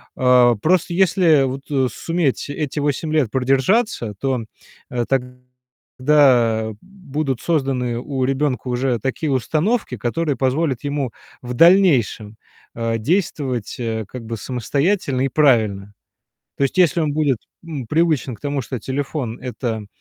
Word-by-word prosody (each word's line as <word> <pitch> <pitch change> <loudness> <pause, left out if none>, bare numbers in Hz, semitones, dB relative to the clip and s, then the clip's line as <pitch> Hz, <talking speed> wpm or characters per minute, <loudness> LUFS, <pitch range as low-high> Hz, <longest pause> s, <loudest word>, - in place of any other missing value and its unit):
А, 125 -2 +5
просто 170 - +1
если 175 -5 +4
вот, 135 +1 -3
э, 135 -3 +1
суметь 165 -3 -1
эти 150 0 -3
8 145 +2 -1
лет 145 -8 +2
продержаться, 135 - +1
то, 130 -4 -1 0.5
э, 120 -1 -2
тогда 125 -2 +1
будут 155 -9 -4
созданы 130 -7 -1
у 130 0 -3
ребенка 135 -1 -1
уже 125 -1 0
такие 135 +5 -2
установки, 155 - 0
которые 145 +7 -1
позволят 135 0 0
ему 140 -4 -2 0.3
в 125 0 -6
дальнейшем, 130 - +4 0.4
а, 115 0 -1
действовать, 135 - -1
э, 110 -2 -3
как 120 0 -9
бы 115 0 -5
самостоятельно 140 - -1
и 135 - +2
правильно. 110 -9 +2 0.6
То - - -3
есть 135 - -2
если 175 -1 +4
он 150 -2 0
будет, 145 -6 +1 0.3
м, 145 -8 -6
привычен 155 -6 +1
к - - -30
тому, 140 -2 -2
что 125 +1 -5
телефон- 135 -3 -4
это 115 -4 -4
135 Hz, 135 wpm, -20 LUFS, 120-150 Hz, 0.6 s, А